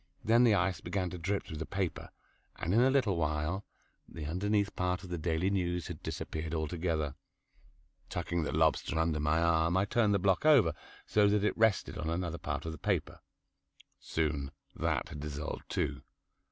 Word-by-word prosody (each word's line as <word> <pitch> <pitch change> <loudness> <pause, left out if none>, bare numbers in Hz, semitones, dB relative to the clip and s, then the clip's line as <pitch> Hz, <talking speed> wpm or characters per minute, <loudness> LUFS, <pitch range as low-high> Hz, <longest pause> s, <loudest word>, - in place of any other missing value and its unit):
Then 115 +2 +5
the 115 -4 +5
ice 95 -2 0
began 90 0 -2
to 90 - -6
drip 100 +4 -1
through 80 - -7
the 80 - -4
paper, 95 -3 -3 0.5
and 85 - -2
in 115 - +5
a 130 - +5
little 125 -9 +2
while, 75 +4 -1 0.5
the 80 -3 -7
underneath 100 +5 0
part 90 +1 -1
of 90 - -9
"The 85 - -2
Daily 80 +4 0
News" 90 -3 0
had - - -7
disappeared 80 +1 -4
altogether. 80 -2 -1 1.0
Tucking 85 0 -2
the 75 - -2
lobster - - +2
under 80 -1 +1
my 75 +2 +2
arm 85 +1 +3
I 95 - +3
turned 105 -1 +2
the - - +5
block 95 0 +2
over, 135 - +6 0.3
so 105 -1 +4
that 100 0 +2
it 105 - +1
rested 110 -3 +2
on 80 +1 -2
another 85 0 -2
part - - -3
of 80 - -3
the 80 - -9
paper. - - -1 0.8
Soon 75 -3 -1 0.3
that - - -1
had 75 - -7
dissolved 75 +1 -5
too. - - -1
85 Hz, 180 wpm, -32 LUFS, 80-100 Hz, 1.0 s, over